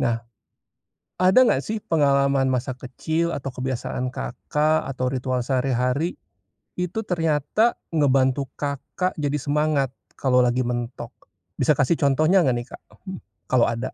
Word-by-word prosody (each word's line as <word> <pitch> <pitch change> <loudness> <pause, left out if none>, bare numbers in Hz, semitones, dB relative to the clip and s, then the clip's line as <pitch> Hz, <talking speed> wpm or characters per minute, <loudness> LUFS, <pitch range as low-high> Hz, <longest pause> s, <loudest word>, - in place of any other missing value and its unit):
nah. 115 -1 0 0.9
Ada 185 +8 +6
nggak 140 - +3
sih 215 -1 -3
pengalaman 140 -3 +2
masa 130 0 -1
kecil 160 +7 -2
atau 135 -1 -4
kebiasaan 130 0 -3
Kakak 150 +5 -1
atau 130 -1 -2
ritual 130 -1 -1
sehari-hari, 130 +4 0 0.6
itu 180 +5 -3
ternyata 165 - +1 0.2
ngebantu 135 -2 +2
Kakak 145 +6 -3
jadi 145 0 0
semangat 145 -2 0 0.2
kalo 125 -2 +3
lagi 125 +1 +1
mentok, 120 0 -4 0.4
bisa 140 +3 +2
kasih 145 +3 +3
contohnya 155 +6 +3
nggak 130 -7 +2
nih, 120 - -4
Kak? - - -10 0.6
Kalo 125 +1 +3
ada? 115 +3 -4
135 Hz, 130 wpm, -23 LUFS, 125-155 Hz, 0.9 s, Ada